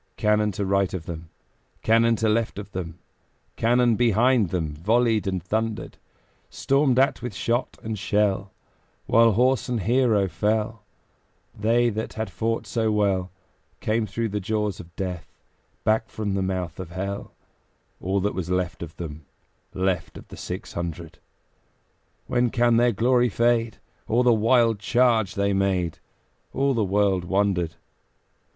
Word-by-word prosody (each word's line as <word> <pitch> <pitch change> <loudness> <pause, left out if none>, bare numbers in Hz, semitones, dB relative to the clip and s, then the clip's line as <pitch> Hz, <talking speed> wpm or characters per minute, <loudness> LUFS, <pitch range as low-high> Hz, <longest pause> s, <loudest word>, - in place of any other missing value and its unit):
Cannon 105 0 +2
to 100 +2 -2
right 100 -1 +1
of 85 -3 -6
them, 85 -1 -7 0.5
Cannon 115 +1 +4
to 110 0 0
left 110 0 0
of 105 0 -7
them, 85 -3 -5 0.6
Cannon 120 0 +3
behind 120 -1 +3
them 80 -4 -2
Volleyed 110 +6 +1
and 95 -3 -2
thundered: 110 +3 -3 0.5
Stormed 135 -2 +1
at 135 +1 +3
with 120 -5 -5
shot 120 +6 -1
and 110 -2 -4
shell, 100 -1 0 0.5
While 115 -1 +5
horse 125 +2 +2
and 120 -3 -1
hero 115 -2 +2
fell, 105 +5 -1 0.7
They 115 +3 +2
that 110 +1 -4
had 110 -3 -4
fought 115 +3 -2
so 110 -2 0
well 100 -3 +1 0.5
Came 110 0 0
through 115 +3 -2
the 105 +1 -2
jaws 105 0 -2
of 85 0 -12
Death 90 -3 -5 0.5
Back 110 +1 +1
from 105 -2 -3
the 95 - 0
mouth 95 -2 -3
of 95 -3 -6
Hell 100 +3 -5 0.7
All 95 +2 0
that 105 +2 0
was 90 -2 -4
left 90 -1 -1
of 80 -2 -8
them, 80 -3 -7 0.5
Left 95 -2 -1
of - - -11
six - - -6
hundred. 85 -1 -6 1.1
When 120 0 +1
can 120 0 +3
their 120 +1 +4
glory 120 +3 +2
fade? 115 0 +1 0.3
O 120 +3 +3
the 125 -1 +5
wild 115 0 +3
charge 115 -3 +2
they 100 0 +1
made! 95 -3 0 0.5
All 135 +1 +1
the 115 -3 +1
world 100 -2 +1
wondered. 95 -3 0
105 Hz, 145 wpm, -24 LUFS, 95-115 Hz, 1.1 s, While